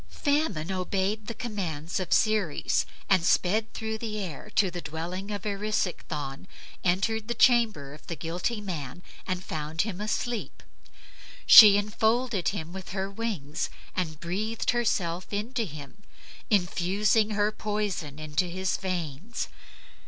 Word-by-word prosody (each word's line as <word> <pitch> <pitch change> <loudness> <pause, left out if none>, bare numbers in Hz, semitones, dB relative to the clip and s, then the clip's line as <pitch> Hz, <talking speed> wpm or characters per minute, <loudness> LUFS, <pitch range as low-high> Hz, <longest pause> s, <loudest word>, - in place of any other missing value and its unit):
Famine 285 - 0
obeyed 195 +3 -1
the 230 - -4
commands 180 -10 -3
of 185 -2 -4
Ceres 215 -8 +2 0.2
and 185 -3 +4
sped 210 +6 +2
through 220 0 -3
the 215 -2 -4
air 185 +1 -6
to 195 -4 +3
the 175 0 -5
dwelling 170 +6 -5
of 205 +1 -4
Erisichthon, 185 -8 -2 0.4
entered 210 +5 +1
the 235 - -2
bedchamber 220 - +3
of 150 - -15
the 170 - -3
guilty 175 +8 -2
man, 170 -5 -5 0.2
and 185 -1 -2
found 155 0 -2
him 205 -3 -5
asleep. 230 +2 -3 0.8
She 210 -4 +11
enfolded 220 -1 +1
him 170 -4 -3
with 190 -1 -7
her 195 0 -2
wings 195 -9 -3 0.3
and 160 -5 -2
breathed 215 +7 -1
herself 185 -7 0
into 225 +3 -1
him, 155 +3 -10 0.5
infusing 200 +3 +2
her 210 +1 +3
poison 205 -9 -3
into 155 +3 -1
his 185 +1 -1
veins. 180 - -4
195 Hz, 130 wpm, -28 LUFS, 170-215 Hz, 0.8 s, She